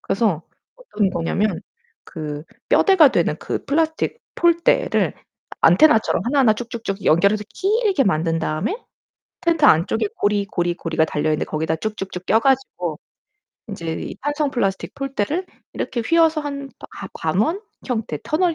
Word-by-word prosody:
그래서 195 Hz, -6 st, 0 dB, 0.3 s
어떤 -, -, -1 dB
거냐면 180 Hz, +3 st, -1 dB, 0.4 s
그 150 Hz, -3 st, -6 dB, 0.3 s
뼈대가 375 Hz, -7 st, +6 dB
되는 -, -, +1 dB
그 -, -, -4 dB
플라스틱 320 Hz, +8 st, 0 dB, 0.2 s
폴대를 340 Hz, -1 st, +2 dB, 0.5 s
안테나처럼 300 Hz, -8 st, +5 dB
하나하나 255 Hz, -2 st, +4 dB
쭉쭉쭉 225 Hz, -3 st, -5 dB
연결해서 200 Hz, +6 st, +3 dB
길게 410 Hz, -, +1 dB
만든 165 Hz, -3 st, +1 dB
다음에 160 Hz, -, -2 dB, 0.7 s
텐트 330 Hz, -3 st, +3 dB
안쪽에 170 Hz, -, +3 dB
고리, 205 Hz, 0 st, +1 dB
고리, 175 Hz, -3 st, -1 dB
고리가 165 Hz, -2 st, 0 dB
달려있는데 155 Hz, 0 st, -1 dB
거기다 160 Hz, +1 st, -1 dB
쭉쭉쭉 190 Hz, 0 st, -5 dB
껴 225 Hz, -, +4 dB
가지고 230 Hz, -, 0 dB, 0.7 s
인제 170 Hz, -6 st, -4 dB
이 -, -, -6 dB
탄성 290 Hz, 0 st, 0 dB
플라스틱 195 Hz, -7 st, -2 dB
폴대를 275 Hz, -, -2 dB, 0.3 s
이렇게 245 Hz, -, -3 dB
휘어서 325 Hz, +1 st, +3 dB
한 280 Hz, -2 st, -6 dB, 0.2 s
하 195 Hz, -, -8 dB
관원 210 Hz, -, 0 dB, 0.3 s
형태 220 Hz, -, -2 dB
터널 335 Hz, +2 st, +1 dB
220 Hz, 315 characters per minute, -21 LUFS, -, 0.7 s, 뼈대가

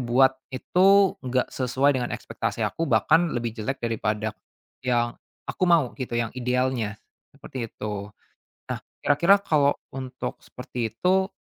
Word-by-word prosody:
buat 130 Hz, +2 st, +4 dB, 0.2 s
itu 190 Hz, +8 st, +4 dB
gak 130 Hz, -1 st, -1 dB
sesuai 135 Hz, +2 st, +2 dB
dengan 120 Hz, -, -2 dB
ekspektasi -, -, -3 dB
aku 165 Hz, -1 st, -2 dB
bahkan 155 Hz, +8 st, +4 dB
lebih 115 Hz, -1 st, -2 dB
jelek 110 Hz, +4 st, -3 dB
daripada 110 Hz, -1 st, -1 dB, 0.5 s
yang 120 Hz, -2 st, +1 dB, 0.3 s
aku -, -, -1 dB
mau 160 Hz, -8 st, +4 dB
gitu, 120 Hz, -2 st, -3 dB
yang 115 Hz, -1 st, -1 dB
idealnya, 125 Hz, -3 st, -1 dB, 0.3 s
seperti 130 Hz, -4 st, -7 dB
itu. 105 Hz, -2 st, -5 dB, 0.6 s
Nah, -, -, -2 dB, 0.2 s
kira-kira 170 Hz, +8 st, +4 dB
kalau 150 Hz, -7 st, +2 dB, 0.2 s
untuk 130 Hz, -1 st, -5 dB
seperti 125 Hz, -2 st, -5 dB
itu, 190 Hz, +2 st, +2 dB
130 Hz, 130 wpm, -25 LUFS, 120-145 Hz, 0.6 s, buat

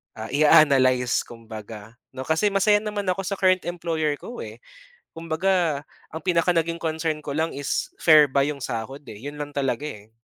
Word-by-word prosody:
ah, 110 Hz, 0 st, -7 dB
ia-analyze, 135 Hz, -5 st, +4 dB
kumbaga 110 Hz, -1 st, -10 dB, 0.2 s
'no. 130 Hz, -, -5 dB
Kasi 160 Hz, +6 st, +2 dB
masaya 205 Hz, +1 st, +3 dB
naman 210 Hz, -1 st, -4 dB
ako 185 Hz, +1 st, 0 dB
sa 200 Hz, -, -2 dB
current 185 Hz, -1 st, +3 dB
employer 165 Hz, -4 st, -1 dB
ko, 245 Hz, -, -9 dB
eh. -, -, -10 dB, 0.6 s
Kumbaga, 165 Hz, -2 st, 0 dB, 0.3 s
ang 160 Hz, 0 st, -6 dB
pinaka 175 Hz, -1 st, +2 dB
naging 165 Hz, 0 st, 0 dB
concern 160 Hz, -1 st, -2 dB
ko 145 Hz, -, -4 dB
lang 160 Hz, +1 st, 0 dB
is 140 Hz, 0 st, -2 dB
fair 155 Hz, -3 st, +7 dB
ba 140 Hz, +1 st, +2 dB
'yong 145 Hz, -2 st, -4 dB
sahod, 125 Hz, +5 st, -5 dB
eh. 105 Hz, -, -10 dB
'Yon 145 Hz, 0 st, -7 dB
lang 145 Hz, -, -7 dB
talaga, 135 Hz, 0 st, -1 dB
eh. 105 Hz, +2 st, -13 dB
155 Hz, 175 wpm, -24 LUFS, 130-170 Hz, 0.6 s, fair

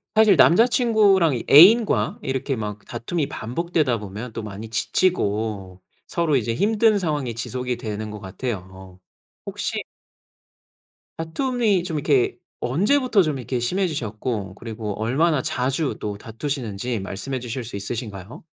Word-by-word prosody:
사실 215 Hz, -3 st, +6 dB
남자친구랑 205 Hz, -, +4 dB
이 120 Hz, -, -4 dB
애인과 180 Hz, -, +6 dB
이렇게 130 Hz, +1 st, -2 dB
막 105 Hz, -2 st, -5 dB
다툼이 140 Hz, +6 st, -3 dB
반복되다 140 Hz, 0 st, -1 dB
보면 105 Hz, +4 st, -7 dB
또 115 Hz, -, -5 dB
많이 105 Hz, +1 st, -7 dB
지치고 105 Hz, -, -1 dB, 0.3 s
서로 170 Hz, -4 st, 0 dB
이제 115 Hz, -3 st, 0 dB
힘든 215 Hz, -, +3 dB
상황이 150 Hz, -9 st, -2 dB
지속이 125 Hz, +1 st, -3 dB
되는 110 Hz, -3 st, -5 dB
것 105 Hz, -, -7 dB
같아요. 95 Hz, -3 st, -7 dB, 0.5 s
혹시 -, -, -3 dB, 1.4 s
다툼이 210 Hz, +3 st, 0 dB
좀 165 Hz, -3 st, -3 dB
이렇게 140 Hz, -4 st, +2 dB, 0.2 s
언제부터 210 Hz, -, +2 dB
좀 155 Hz, -5 st, 0 dB
이렇게 125 Hz, 0 st, -3 dB
심해지셨고 120 Hz, -, -2 dB
그리고 110 Hz, -2 st, -6 dB
얼마나 145 Hz, +6 st, +2 dB
자주 135 Hz, +4 st, -1 dB
또 105 Hz, -1 st, -4 dB
다투시는지 115 Hz, -1 st, -4 dB
말씀해 100 Hz, +7 st, -4 dB
주실 120 Hz, +1 st, -5 dB
수 115 Hz, -2 st, -8 dB
있으신가요? 100 Hz, 0 st, -6 dB
125 Hz, 305 characters per minute, -23 LUFS, 110-170 Hz, 1.4 s, 사실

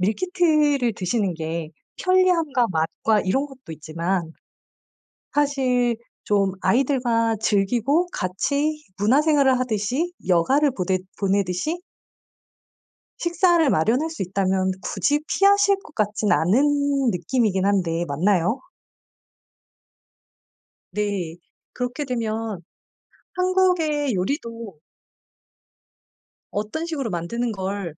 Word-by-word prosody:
meal 200 Hz, +4 st, +1 dB
kit를 305 Hz, -9 st, +2 dB
드시는 195 Hz, 0 st, -1 dB
게 160 Hz, 0 st, -4 dB, 0.3 s
편리함과 350 Hz, -9 st, +3 dB
맛과 180 Hz, +6 st, +1 dB
이런 265 Hz, +10 st, +1 dB
것도 265 Hz, -, -15 dB
있지만 165 Hz, +2 st, -3 dB, 1.0 s
사실 260 Hz, -4 st, +1 dB, 0.3 s
좀 200 Hz, -2 st, +1 dB
아이들과 240 Hz, -4 st, +1 dB
즐기고 235 Hz, -, +1 dB
같이 280 Hz, +12 st, -1 dB, 0.2 s
문화 220 Hz, +9 st, +3 dB
생활을 285 Hz, -4 st, +3 dB
하듯이 250 Hz, -, -1 dB
여가를 265 Hz, -, +3 dB
보댓 185 Hz, -4 st, -1 dB, 0.2 s
보내듯이 195 Hz, -, 0 dB, 1.4 s
식사를 345 Hz, -2 st, +3 dB
마련할 245 Hz, -, +2 dB
수 320 Hz, -, -7 dB
있다면 190 Hz, 0 st, 0 dB
굳이 210 Hz, +12 st, 0 dB
피하실 400 Hz, 0 st, +4 dB
것 305 Hz, -, -15 dB
같진 210 Hz, 0 st, 0 dB
않은 275 Hz, -, +2 dB
느낌이긴 190 Hz, +2 st, 0 dB
한데 175 Hz, -4 st, +1 dB
맞나요? 180 Hz, -, +1 dB, 2.3 s
네. 190 Hz, -4 st, -2 dB, 0.4 s
그렇게 250 Hz, +4 st, -3 dB
되면 225 Hz, -5 st, -3 dB, 0.7 s
한국의 360 Hz, -7 st, +1 dB
요리도 230 Hz, -, -4 dB, 1.7 s
어떤 215 Hz, +11 st, -3 dB
식으로 290 Hz, -8 st, -3 dB
만드는 220 Hz, +7 st, -2 dB
걸 190 Hz, -4 st, -4 dB
230 Hz, 225 characters per minute, -23 LUFS, 190-290 Hz, 2.3 s, 피하실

